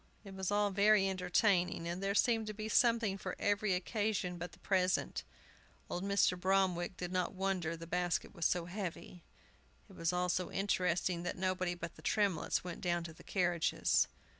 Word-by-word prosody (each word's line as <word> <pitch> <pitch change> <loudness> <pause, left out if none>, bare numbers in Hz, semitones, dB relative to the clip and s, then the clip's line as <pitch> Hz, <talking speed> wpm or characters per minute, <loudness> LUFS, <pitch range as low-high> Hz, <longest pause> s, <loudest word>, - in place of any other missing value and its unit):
It 195 -2 -10
was 190 -1 -3
all 205 0 +2
very 200 0 +4
entertaining, 180 -2 +1
and 175 +2 -3
there 195 0 0
seemed 225 0 +3
to 215 - -5
be 215 +1 -4
something 230 -4 +3
for - - -4
every 205 -1 +1
occasion 185 -2 -1
but 175 +1 -5
the - - -16
present. 185 -2 0 0.7
Old 180 - -2
Mr. 200 -2 +3
Bromwick 185 -1 +1
did 180 0 -4
not 185 0 -1
wonder 185 -4 -1
the 165 - -8
basket 175 +1 -1
was 170 -4 +1
so 175 -1 0
heavy. 180 -1 -6 0.7
It 200 - -15
was 165 0 0
all 180 0 0
so 180 +1 -1
interesting 180 -3 0
that 175 - -4
nobody 185 -1 -1
but 170 -1 -7
the - - -12
Tremletts 195 0 +1
went 175 -1 -6
down 175 -1 0
to 165 -1 -8
the - - -16
carriages. 175 -3 +1
185 Hz, 180 wpm, -34 LUFS, 175-200 Hz, 0.7 s, very